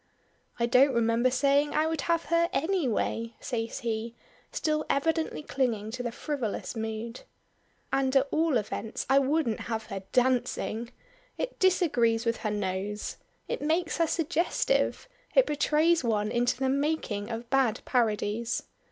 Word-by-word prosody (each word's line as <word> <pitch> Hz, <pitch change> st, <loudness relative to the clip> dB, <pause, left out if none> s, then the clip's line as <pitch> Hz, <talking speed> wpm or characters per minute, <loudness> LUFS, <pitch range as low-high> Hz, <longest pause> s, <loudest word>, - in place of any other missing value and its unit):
"I 235 Hz, -, +3 dB
don't 255 Hz, +2 st, +4 dB
remember 230 Hz, +2 st, +3 dB
saying 280 Hz, +3 st, +2 dB
I 305 Hz, -, +3 dB
would 320 Hz, -2 st, -1 dB
have 335 Hz, -1 st, +2 dB
her 335 Hz, 0 st, +4 dB
any 340 Hz, 0 st, +1 dB
way," 230 Hz, 0 st, -1 dB
says 230 Hz, 0 st, -3 dB
he, 230 Hz, 0 st, -3 dB, 0.4 s
still 305 Hz, -1 st, 0 dB
evidently 320 Hz, +2 st, 0 dB
clinging 225 Hz, -7 st, -1 dB
to 250 Hz, +2 st, -4 dB
the 240 Hz, -1 st, -3 dB
frivolous 255 Hz, -4 st, -3 dB
mood. 225 Hz, +1 st, -4 dB, 0.7 s
"And 270 Hz, 0 st, +1 dB
at 270 Hz, +1 st, +4 dB
all 315 Hz, -4 st, +2 dB
events 215 Hz, 0 st, -4 dB
I 275 Hz, -, +7 dB
wouldn't 275 Hz, -4 st, +1 dB
have 220 Hz, -1 st, -2 dB
her 195 Hz, -, -4 dB
dancing. 245 Hz, -2 st, +1 dB, 0.5 s
It -, -, -4 dB
disagrees 245 Hz, -12 st, +3 dB
with 230 Hz, 0 st, +1 dB
her 215 Hz, -, -2 dB
nose. 205 Hz, 0 st, -3 dB, 0.3 s
It -, -, -3 dB
makes 325 Hz, +3 st, 0 dB
her 330 Hz, -, +3 dB
suggestive; 345 Hz, +12 st, 0 dB, 0.3 s
it -, -, +7 dB
betrays 305 Hz, +2 st, +2 dB
one 210 Hz, -3 st, 0 dB
into 240 Hz, 0 st, +1 dB
the 265 Hz, 0 st, 0 dB
making 275 Hz, -7 st, -1 dB
of 230 Hz, +1 st, -5 dB
bad 260 Hz, -5 st, +2 dB
parodies. 225 Hz, -1 st, 0 dB
250 Hz, 145 wpm, -28 LUFS, 225-305 Hz, 0.7 s, I